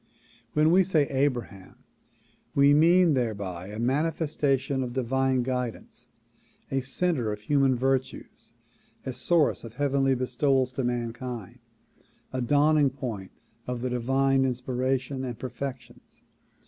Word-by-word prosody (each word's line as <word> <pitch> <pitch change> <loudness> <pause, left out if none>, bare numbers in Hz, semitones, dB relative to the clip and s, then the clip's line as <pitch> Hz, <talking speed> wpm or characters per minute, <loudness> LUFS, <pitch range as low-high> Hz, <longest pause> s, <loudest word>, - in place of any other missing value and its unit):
When 155 +1 +4
we 190 +2 +6
say 160 -6 +2
"Abraham" 125 -8 -2 0.8
we 140 +1 +6
mean 170 +2 +5
thereby 100 -8 -3
a 105 +1 -8
manifestation 140 0 0
of 125 -2 -4
divine 130 0 +1
guidance, 125 -2 -5 0.6
a 135 - +1
center 135 -3 -1
of 105 0 -6
human 135 +2 +2
virtues, 130 +1 -3 0.5
a 130 - -3
source 165 +3 +1
of 115 -1 -10
heavenly 135 -1 +1
bestowals 130 +1 +1
to 130 +1 -3
mankind, 120 -1 -4 0.7
a 130 - -1
dawning 145 +3 +3
point 115 -8 -6 0.4
of 125 -1 -3
divine 135 +2 +1
inspiration 130 +1 -1
and 125 -3 -5
perfections. 130 -1 -8
130 Hz, 115 wpm, -27 LUFS, 120-140 Hz, 0.8 s, we